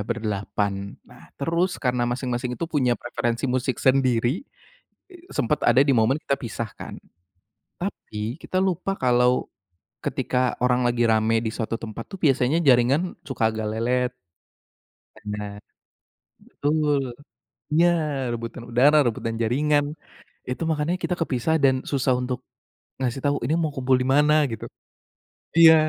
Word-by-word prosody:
berdelapan. 100 -3 -2
Nah, - - -17
terus 170 +6 0
karena 125 -2 0
masing-masing 125 -1 -2
itu 170 - -2
punya 140 -7 +1
preferensi 120 +1 -2
musik 130 -1 0
sendiri, 130 -2 +2 0.9
sempat 150 +5 0
ada 125 +3 +5
di 140 - +3
momen 115 +5 +3
kita 140 - 0
pisah, 115 -2 -4
kan. - - -7 0.8
Tapi, 110 +7 -5
kita 185 - -3
lupa 190 +1 -1
kalau, 125 0 +2 0.6
ketika 125 -1 0
orang 125 0 +2
lagi 120 0 +1
rame 110 0 +3
di 110 - -1
suatu 115 -1 -2
tempat, 110 -2 -6
tuh, 195 - -7
biasanya 135 +1 +3
jaringan 135 +7 +3
suka 115 -5 +1
agak 110 -1 -3
lelet. 125 +3 0 1.0
Benar. 105 -1 -6 0.9
Betul. 150 -1 +1 0.7
Iya, 170 +2 +5 0.5
rebutan 115 +1 -6
udara, 135 +6 +5
rebutan 115 0 -2
jaringan. 145 +5 +2 0.6
Itu 130 +6 -3
makannya 155 +3 0
kita 180 - 0
kepisah 160 +1 0
dan 130 -1 +6 0.2
susah 135 -2 +1
untuk, 125 0 -2 0.6
ngasih 130 0 -2
tahu, 145 0 +2
ini 155 - +1
mau 155 - 0
kumpul 130 0 +3
di - - -2
mana, 150 +1 +5 0.2
gitu. 115 - -5 0.9
Iya, 160 -1 +10
125 Hz, 130 wpm, -24 LUFS, 115-145 Hz, 1.0 s, Iya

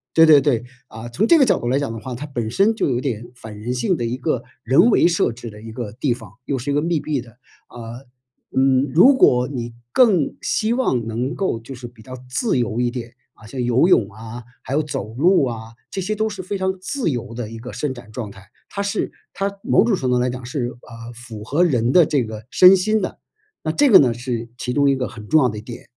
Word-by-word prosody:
对， 160 - +8
对， 150 -3 +7
对， 125 -5 +1 0.2
啊， 110 0 -9
从 190 - 0
这 335 - +6
个 280 - +5
角 225 - +2
度 - - -4
来 130 +3 +2
讲 140 -5 -2
的 115 - -6
话， 125 +2 -6
它 135 +5 -6
本 120 -6 -4
身 195 - +3
就 220 - -1
有 120 -2 0
点 120 -4 -4
反 110 -4 -10
人 120 +4 -3
性 125 -2 +1
的 120 - -4
一 120 +2 -2
个 125 -1 -1 0.2
人 140 - +5
为 215 - +4
设 170 -7 +1
置 115 0 -9
的 105 0 -13
一 115 0 -9
个 110 -2 -6
地 125 +1 -1
方， 110 -6 -13
又 140 - -1
是 130 +3 -3
一 - - 0
个 145 - +2
密 165 0 0
闭 145 -3 -2
的， 115 -1 -15 0.3
啊。 120 +1 -9 0.5
嗯， 130 0 +2
如 250 - +7
果 125 - +4
你 120 -4 -5 0.2
更 200 - +3
希 220 +1 0
望 130 - 0
能 120 +5 -3
够 190 -11 -1
就 120 +4 -9
是 120 -1 -8
比 120 -1 -17
较 130 +3 -9
自 170 - 0
由 120 -1 -1
一 120 -1 0
点， 120 -1 -7 0.2
啊， 110 - -16
像 125 +3 -4
游 120 +6 +3
泳 115 - +3
啊， 115 +3 -9 0.2
还 130 - -6
有 155 +2 +2
走 110 -7 -5
路 165 +5 +3
啊， 115 -2 -6 0.2
这 190 - -4
些 195 +4 -2
都 220 +1 +1
是 205 -3 -6
非 200 +3 -3
常 190 0 -1
自 255 +2 -2
由 120 -3 -4
的 115 -2 -5
一 115 - -8
个 120 +2 -8
伸 135 +1 -3
展 120 -3 -13
状 110 -2 -5
态， 95 -1 -14 0.2
它 200 - -4
是 200 - -2 0.2
它 195 0 -1
某 - - +3
种 230 -4 +2
程 130 -7 -1
度 125 - +2
来 125 +1 +1
讲 125 0 -6
是， 130 0 -3
呃， 120 -1 -11
符 115 -3 -10
合 150 +9 +2
人 125 -7 +1
的 175 -3 +7
这 140 -4 0
个 110 0 -8
身 185 +6 +7
心 215 +3 +1
的， 185 - -4 0.4
那 155 - 0
这 290 - +3
个 210 - +9
呢 125 -4 +3
是 120 -1 -4
其 125 0 -3
中 140 0 +3
一 135 - +2
个 125 - -2
很 105 -3 -11
重 155 - +5
要 130 - +4
的 105 -3 -5
点。 115 +2 -10
125 Hz, 270 characters per minute, -21 LUFS, 115-160 Hz, 0.5 s, 个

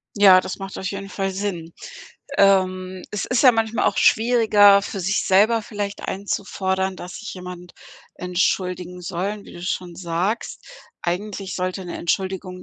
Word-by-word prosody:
Ja, 195 -3 +7
das 185 - -6
macht 195 0 -7
auf 190 - -3
jeden 195 0 -6
Fall 195 -1 -2
Sinn. 185 -4 -4 0.7
Ähm, 185 -1 +2
es 210 - -3
ist 250 -2 +1
ja 255 -3 +8
manchmal 225 0 0
auch - - +1
schwieriger 215 -3 +5
für 200 0 -6
sich 195 +2 0
selber 215 +4 +4
vielleicht 205 -1 -5
einzufordern, 190 -1 -2
dass 180 0 -8
sich 215 - -7
jemand 180 -1 -9 0.4
entschuldigen 180 0 -1
soll, 195 +4 -4
wie - - -13
du 175 - -10
schon 180 -1 -3
sagst. 175 +5 -3 0.4
Eigentlich 195 +2 -3
sollte 185 +1 -3
’ne 175 - -6
Entschuldigung 185 +1 -2
190 Hz, 150 wpm, -22 LUFS, 180-205 Hz, 0.7 s, ja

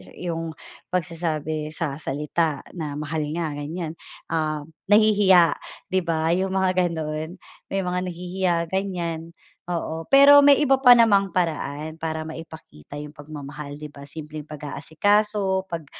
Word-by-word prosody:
yung 165 -2 -4 0.3
pagsasabi 160 -3 -2
sa 150 -3 -3
salita 150 +1 -1
na, 150 -5 -5
mahal 150 +1 -3
nga, 165 -3 -2
ganyan, 155 +3 -5 0.3
ah, 155 -2 -1 0.2
nahihiya, 205 -6 +5 0.3
'di 185 - +3
ba, 160 0 +1
yung 190 +2 0
mga 185 -1 +2
gano'n. 160 +1 -4 0.3
May 195 -1 -1
mga 180 0 -1
nahihiya, 180 +1 -1 0.2
ganyan. 170 -4 -3 0.3
Oo, 165 -2 -3
pero 280 +1 +9
may 285 -1 +7
iba 270 -2 +3
pa 245 -2 +9
namang 200 -4 +4
paraan 155 -3 -2
para 160 -1 -3
maipakita 160 - -10
yung 150 - -11
pagmamahal, 145 -1 -8
'di 150 0 -9
ba? 140 - -12
Simpleng 150 +1 -7
pag-aasikaso, 190 +7 0
pag 165 -3 -5
165 Hz, 130 wpm, -24 LUFS, 155-190 Hz, 0.3 s, pero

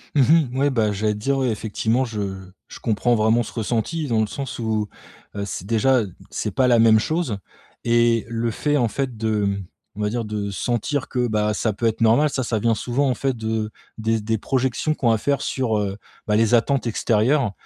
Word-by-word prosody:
Mmh 140 - +5 0.3
mh. 130 - -4
Ouais. 140 +1 +3
Bah 110 -5 +1
j'allais 105 +1 0
te 105 - -6
dire, 135 +5 0
ouais, 130 -2 +1
effectivement 110 +3 0
je 110 -3 -4 0.5
je - - -11
comprends 120 +2 +1
vraiment 110 +2 +3
ce - - -9
ressenti, 120 +8 -2
dans 115 -2 +2
le 110 - +1
sens 135 +1 -6
où, 110 -2 -1 0.5
heu, 100 - -3
c'est 95 - -5
déjà 115 +4 +3 0.3
c'est - - -3
pas 130 -1 +2
la 120 - +5
même 110 -1 +6
chose, 155 - -1 0.5
et 115 -1 +3
le 115 0 -1
fait, 145 +6 0
en 120 -4 +2
fait 130 -1 -3
de 110 -2 0
m 100 -1 -1 0.3
on 105 - -6
va 105 - +1
dire, 115 0 -2
de 105 -1 -3
sentir 120 +7 -1
que, 125 -1 0
bah, 105 -1 +1
ça 110 +1 0
peut 110 +3 -4
être 110 0 0
normal, 125 +7 +4
ça 130 - -1
ça 115 -1 -1
vient 115 +2 +2
souvent, 125 +6 0
en - - +2
fait, 135 +1 -1
de 110 -1 -2 0.3
des 110 0 0
des 110 +1 0
projections 130 +5 0
qu'on 120 - +1
va 110 - +2
faire 140 +2 0
sur, 120 -5 0
heu, 100 -1 -2 0.3
bah, 105 - +2
les 115 +2 +4
attentes 125 +1 +1
extérieures. 115 +3 +2
115 Hz, 220 wpm, -22 LUFS, 110-130 Hz, 0.5 s, même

